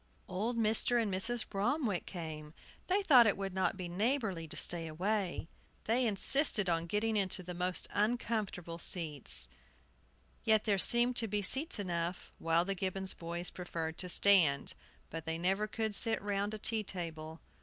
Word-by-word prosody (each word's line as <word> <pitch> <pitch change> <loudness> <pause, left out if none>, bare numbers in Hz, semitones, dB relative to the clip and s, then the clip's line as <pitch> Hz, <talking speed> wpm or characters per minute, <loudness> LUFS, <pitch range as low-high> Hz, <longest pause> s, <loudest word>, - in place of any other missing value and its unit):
Old 215 +6 -2
Mr. 225 +2 +2
and 215 -4 -1
Mrs. 225 +5 +1
Bromwick 215 - -1
came. 155 -3 -7 0.3
They 390 +2 +1
thought 255 -10 +7
it 205 - +1
would 195 -1 -4
not 190 +2 0
be 180 -2 -5
neighborly 195 - 0
to - - -9
stay 170 -2 0
away. 185 +2 -2 0.4
They 240 +2 +1
insisted 215 +1 +2
on 165 -1 0
getting 215 +4 0
into 190 -2 -1
the 180 0 -6
most 180 +1 -2
uncomfortable 210 -6 -2
seats. 150 - 0 1.0
Yet 220 -1 +3
there 200 -3 +1
seemed 240 +4 +4
to 225 - +1
be 205 0 -2
seats 270 - +2
enough 175 -3 -4
while 165 +1 +1
the 195 - -1
Gibbons 190 0 -3
boys 170 +1 -5
preferred 165 -3 -5
to 180 - -5
stand. 175 -8 +4 0.4
But 165 0 -6
they 160 0 -2
never 190 +5 0
could 220 0 -3
sit 225 +2 +2
round 205 +1 -2
a - - -5
tea 220 +1 +2
table. 165 -4 -6
195 Hz, 165 wpm, -33 LUFS, 170-220 Hz, 1.0 s, thought